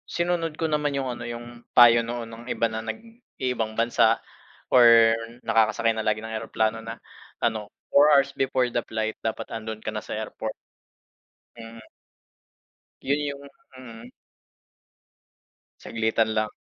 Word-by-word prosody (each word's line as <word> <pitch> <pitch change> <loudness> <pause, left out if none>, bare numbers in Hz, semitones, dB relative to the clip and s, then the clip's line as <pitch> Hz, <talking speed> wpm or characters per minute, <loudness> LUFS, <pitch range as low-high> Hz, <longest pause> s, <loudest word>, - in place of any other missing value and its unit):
sinunod 170 -2 0
ko 165 - +1
naman 150 -1 0
'yong, 135 -2 -2
ano, - - -8
'yong 120 0 -8
payo 120 -1 +7
noon 120 0 -5
ng 115 +1 -11
iba 115 - +1
na 110 0 -5
nag-iibang 125 - -5
bansa 115 -1 +3 0.5
or 115 -2 +7 0.3
nakakasakay 115 0 +2
na 110 - -2
lagi 110 0 0
ng 110 0 -5
eroplano 110 0 -1
na, 115 0 -7 0.4
ano, 110 -3 -2 0.2
4 145 +2 +6
hours 140 0 +3
before 130 -1 +1
the 120 - -1
flight 110 0 -2
dapat 110 -1 -3
andoon 110 -1 -5
ka 110 - -3
na 105 - -4
sa - - -6
airport. 110 0 -5 1.1
Mm. 115 0 -10 1.2
'Yon 140 +1 0
'yong 140 -1 -4 0.4
mm. 120 -1 -11 1.7
Saglitan 110 0 0
lang. 110 0 0
115 Hz, 135 wpm, -25 LUFS, 110-130 Hz, 1.7 s, payo